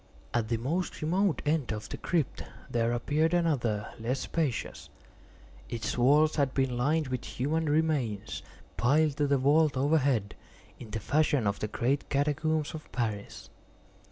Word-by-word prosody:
At 115 Hz, -2 st, +1 dB
the 115 Hz, 0 st, 0 dB
most 155 Hz, +8 st, -2 dB
remote 185 Hz, +3 st, +1 dB
end 150 Hz, -5 st, +1 dB
of 105 Hz, -1 st, -4 dB
the -, -, -5 dB
crypt 165 Hz, -6 st, -1 dB, 0.3 s
there 115 Hz, 0 st, +1 dB
appeared 150 Hz, +7 st, +1 dB
another 120 Hz, -12 st, 0 dB
less 125 Hz, +4 st, -2 dB
spacious. 155 Hz, -8 st, -2 dB, 0.8 s
Its 115 Hz, -2 st, -3 dB
walls 150 Hz, +6 st, +4 dB
had 140 Hz, -3 st, +1 dB
been 130 Hz, -2 st, +1 dB
lined 145 Hz, +4 st, +1 dB
with 125 Hz, -2 st, -3 dB
human 155 Hz, +4 st, -1 dB
remains, 140 Hz, -10 st, 0 dB, 0.4 s
piled 145 Hz, +3 st, +3 dB
to 145 Hz, -, +2 dB
the 140 Hz, 0 st, +3 dB
vault 145 Hz, +2 st, +3 dB
overhead, 135 Hz, -7 st, +2 dB, 0.5 s
in 120 Hz, -, -9 dB
the 115 Hz, -, -3 dB
fashion 145 Hz, +1 st, +1 dB
of 100 Hz, 0 st, 0 dB
the 105 Hz, -, -2 dB
great 130 Hz, +6 st, -1 dB
catacombs 150 Hz, +2 st, 0 dB
of 155 Hz, -1 st, -9 dB
Paris. 110 Hz, -4 st, -4 dB
140 Hz, 150 wpm, -29 LUFS, 120-155 Hz, 0.8 s, walls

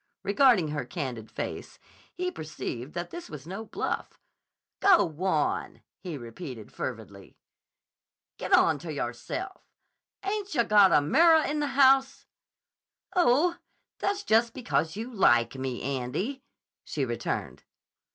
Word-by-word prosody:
Regarding 205 Hz, -, +4 dB
her 150 Hz, -1 st, -2 dB
candid 125 Hz, -10 st, -5 dB
face, -, -, -6 dB, 0.4 s
he 365 Hz, 0 st, -2 dB
perceived 150 Hz, -, -6 dB
that 175 Hz, 0 st, -4 dB
this 345 Hz, -, -8 dB
was 150 Hz, -3 st, -9 dB
no 190 Hz, +6 st, -6 dB
bluff. -, -, -4 dB, 0.6 s
"Go 385 Hz, -, +6 dB
wan!" 160 Hz, -1 st, -1 dB, 0.2 s
he 175 Hz, -5 st, -6 dB
repeated 120 Hz, -, -9 dB
fervidly. -, -, -7 dB, 1.0 s
"Get -, -, -5 dB
onto 160 Hz, +1 st, +4 dB
yahrself. 145 Hz, -, -5 dB, 0.6 s
Ain't 400 Hz, 0 st, -3 dB
yah 235 Hz, -, +4 dB
got 205 Hz, -4 st, +6 dB
a -, -, +5 dB
mirrah 320 Hz, -, +5 dB
in 300 Hz, +1 st, -1 dB
the 295 Hz, -, 0 dB
house?" 270 Hz, 0 st, +4 dB, 0.9 s
"Oh, 345 Hz, +1 st, +3 dB, 0.4 s
that's 405 Hz, 0 st, -1 dB
just 230 Hz, -, +2 dB
because 195 Hz, -10 st, -1 dB
you 230 Hz, +4 st, -6 dB
like 120 Hz, -, +4 dB
me, 130 Hz, -2 st, -4 dB
Andy," 140 Hz, -, -3 dB, 0.4 s
she -, -, -2 dB
returned. -, -, -4 dB
195 Hz, 120 wpm, -28 LUFS, -, 1.0 s, Go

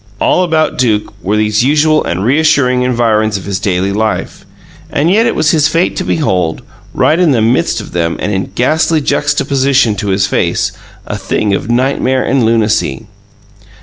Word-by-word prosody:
All -, -, +2 dB
about 160 Hz, -5 st, 0 dB
Duke 110 Hz, -5 st, 0 dB
were 105 Hz, +3 st, -1 dB
these 105 Hz, +1 st, +1 dB
usual 155 Hz, +3 st, +2 dB
and 90 Hz, +4 st, -3 dB
reassuring 135 Hz, -2 st, +2 dB
environs 115 Hz, -4 st, +1 dB
of 95 Hz, -, -9 dB
his 100 Hz, -1 st, -3 dB
daily 95 Hz, -1 st, -1 dB
life, 110 Hz, +1 st, -3 dB, 0.4 s
and 160 Hz, +4 st, 0 dB
yet 225 Hz, +4 st, +3 dB
it -, -, -1 dB
was 155 Hz, -, +2 dB
his 155 Hz, -3 st, +3 dB
fate 170 Hz, +2 st, 0 dB
to -, -, -1 dB
behold, 95 Hz, -, -1 dB, 0.3 s
right 160 Hz, -, +1 dB
in 170 Hz, -6 st, +3 dB
the 120 Hz, -, +1 dB
midst 115 Hz, +3 st, +1 dB
of -, -, -9 dB
them, 85 Hz, -1 st, -1 dB
and 105 Hz, -, -2 dB
in 95 Hz, 0 st, -2 dB
ghastly 155 Hz, +5 st, +1 dB
juxtaposition 140 Hz, -4 st, +1 dB
to 100 Hz, -, -4 dB
his 95 Hz, 0 st, +1 dB
face, 100 Hz, -, -1 dB, 0.3 s
a -, -, -5 dB
thing 105 Hz, -2 st, -1 dB
of 100 Hz, -, -3 dB
nightmare 130 Hz, +1 st, 0 dB
and 130 Hz, 0 st, +1 dB
lunacy. 110 Hz, -, 0 dB
125 Hz, 175 wpm, -12 LUFS, 105-150 Hz, 0.4 s, yet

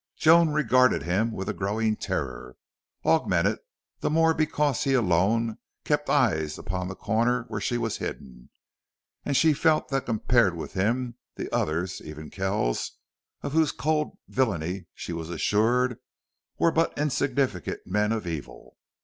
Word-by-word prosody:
Joan 165 Hz, +1 st, +6 dB
regarded 130 Hz, -4 st, +3 dB
him 100 Hz, +7 st, +1 dB
with 95 Hz, -3 st, -5 dB
a -, -, -1 dB
growing 110 Hz, +2 st, 0 dB
terror 65 Hz, -12 st, -4 dB, 0.5 s
augmented -, -, +2 dB, 0.4 s
the -, -, -1 dB
more 160 Hz, +1 st, +4 dB
because 150 Hz, -4 st, +1 dB
he 135 Hz, -1 st, +2 dB
alone 110 Hz, +2 st, +2 dB, 0.3 s
kept -, -, 0 dB
eyes 80 Hz, -1 st, +2 dB
upon 90 Hz, 0 st, -4 dB
the 95 Hz, -, -6 dB
corner 115 Hz, +4 st, +1 dB
where 105 Hz, -, -4 dB
she 120 Hz, +4 st, 0 dB
was 115 Hz, -2 st, -2 dB
hidden -, -, -7 dB, 0.8 s
and 140 Hz, -2 st, +1 dB
she 160 Hz, -2 st, +5 dB
felt 155 Hz, -2 st, +2 dB
that 135 Hz, -1 st, -1 dB
compared 115 Hz, -4 st, +2 dB
with 85 Hz, -, -7 dB
him 120 Hz, +5 st, -1 dB, 0.2 s
the -, -, -6 dB
others, 85 Hz, +4 st, -1 dB
even 75 Hz, 0 st, -9 dB
Kells, 95 Hz, -, -1 dB, 0.5 s
of -, -, -3 dB
whose 160 Hz, 0 st, +3 dB
cold 150 Hz, 0 st, -1 dB
villainy 95 Hz, -7 st, -1 dB
she 85 Hz, -, -6 dB
was 80 Hz, -1 st, -5 dB
assured, 110 Hz, -, +1 dB, 0.6 s
were 165 Hz, -, +3 dB
but 165 Hz, +1 st, +1 dB
insignificant 135 Hz, -, -1 dB
men 105 Hz, +3 st, +1 dB
of 110 Hz, -3 st, -2 dB
evil. 75 Hz, -8 st, -7 dB
110 Hz, 145 wpm, -26 LUFS, 90-135 Hz, 0.8 s, Joan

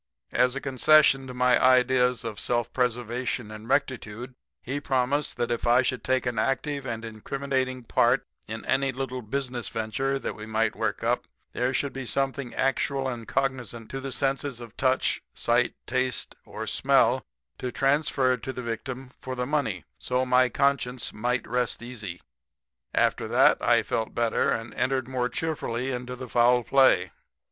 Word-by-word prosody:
"As 125 Hz, +1 st, +2 dB
a -, -, -1 dB
concession 135 Hz, 0 st, +4 dB
to 125 Hz, -, -7 dB
my 125 Hz, -1 st, +3 dB
ideas 125 Hz, -1 st, +4 dB
of 110 Hz, -3 st, -5 dB
self 120 Hz, -1 st, 0 dB
preservation 125 Hz, -2 st, -1 dB
and 110 Hz, +2 st, -9 dB
rectitude 125 Hz, -3 st, -1 dB, 0.3 s
he 140 Hz, +4 st, -3 dB
promised 135 Hz, +2 st, 0 dB
that 120 Hz, -1 st, -1 dB
if 120 Hz, 0 st, -1 dB
I 120 Hz, +2 st, +5 dB
should 130 Hz, 0 st, -2 dB
take 130 Hz, -1 st, +1 dB
an 120 Hz, -3 st, -1 dB
active 135 Hz, +3 st, -1 dB
and 115 Hz, -1 st, -4 dB
incriminating 130 Hz, +3 st, -2 dB
part -, -, +2 dB, 0.2 s
in -, -, -6 dB
any 135 Hz, 0 st, +1 dB
little 130 Hz, 0 st, -4 dB
business 125 Hz, -1 st, -3 dB
venture 120 Hz, +5 st, -1 dB
that -, -, -4 dB
we 105 Hz, 0 st, -9 dB
might 110 Hz, +1 st, 0 dB
work -, -, -2 dB
up -, -, 0 dB, 0.3 s
there 125 Hz, +1 st, 0 dB
should 140 Hz, +1 st, -1 dB
be 135 Hz, -2 st, -5 dB
something 135 Hz, -1 st, -1 dB
actual 135 Hz, 0 st, 0 dB
and 120 Hz, -3 st, -5 dB
cognizant 125 Hz, -4 st, -2 dB
to 135 Hz, -, -3 dB
the 135 Hz, 0 st, -5 dB
senses 135 Hz, -1 st, -1 dB
of 120 Hz, -1 st, -10 dB
touch, 130 Hz, -1 st, +1 dB
sight, -, -, +1 dB
taste 130 Hz, 0 st, -1 dB
or -, -, -6 dB
smell -, -, +3 dB, 0.4 s
to 125 Hz, -, -3 dB
transfer 135 Hz, -2 st, +2 dB
to 130 Hz, -, -5 dB
the 125 Hz, -1 st, -6 dB
victim 125 Hz, +3 st, -5 dB
for 130 Hz, 0 st, -5 dB
the 125 Hz, 0 st, -2 dB
money 125 Hz, -, -1 dB
so 125 Hz, 0 st, 0 dB
my 125 Hz, 0 st, +4 dB
conscience 130 Hz, -3 st, 0 dB
might 120 Hz, +2 st, -1 dB
rest 125 Hz, 0 st, -1 dB
easy. 105 Hz, -8 st, -6 dB, 0.7 s
After -, -, +2 dB
that -, -, +4 dB
I -, -, +4 dB
felt 110 Hz, -1 st, -2 dB
better 115 Hz, -1 st, +1 dB
and 115 Hz, +1 st, -3 dB
entered 130 Hz, -1 st, 0 dB
more 125 Hz, -1 st, -1 dB
cheerfully 135 Hz, -6 st, -2 dB
into 125 Hz, 0 st, -4 dB
the 130 Hz, 0 st, -7 dB
foul 120 Hz, +1 st, +4 dB
play. 125 Hz, -9 st, +4 dB
125 Hz, 165 wpm, -27 LUFS, 120-135 Hz, 0.7 s, I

